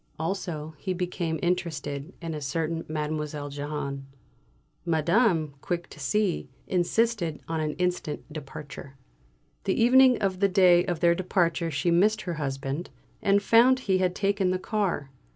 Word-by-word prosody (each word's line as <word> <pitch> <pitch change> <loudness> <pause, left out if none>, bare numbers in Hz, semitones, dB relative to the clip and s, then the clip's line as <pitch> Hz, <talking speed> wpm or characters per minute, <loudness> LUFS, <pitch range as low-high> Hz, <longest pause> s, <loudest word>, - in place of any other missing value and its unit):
Also, 160 -2 -3
he 185 +6 -2
became 175 -2 -2
interested 155 -4 -2
in 165 -1 -3
a 150 - -5
certain 160 +3 -2
Mdlle. 150 -1 -3
Jehane. 140 -1 -4 0.8
Madame, 170 - +2
quick 175 -1 -3
to - - -12
see, 175 0 0 0.2
insisted 180 -2 0
on 165 -1 -2
an 155 -1 -1
instant 180 -4 -2
departure. 140 -2 -9 0.7
The 190 - +1
evening 255 +1 +6
of 195 -3 -1
the 200 0 +3
day 180 -2 +5
of 175 -4 -2
their 170 0 +5
departure 170 -2 0
she 155 +3 0
missed 210 +5 +3
her 175 - -3
husband, 135 +3 -3 0.3
and 200 0 +3
found 250 +4 +5
he 190 -6 +1
had 180 -1 +1
taken 200 -1 +1
the 185 - +1
car. 185 -8 -2
170 Hz, 145 wpm, -27 LUFS, 150-190 Hz, 0.8 s, evening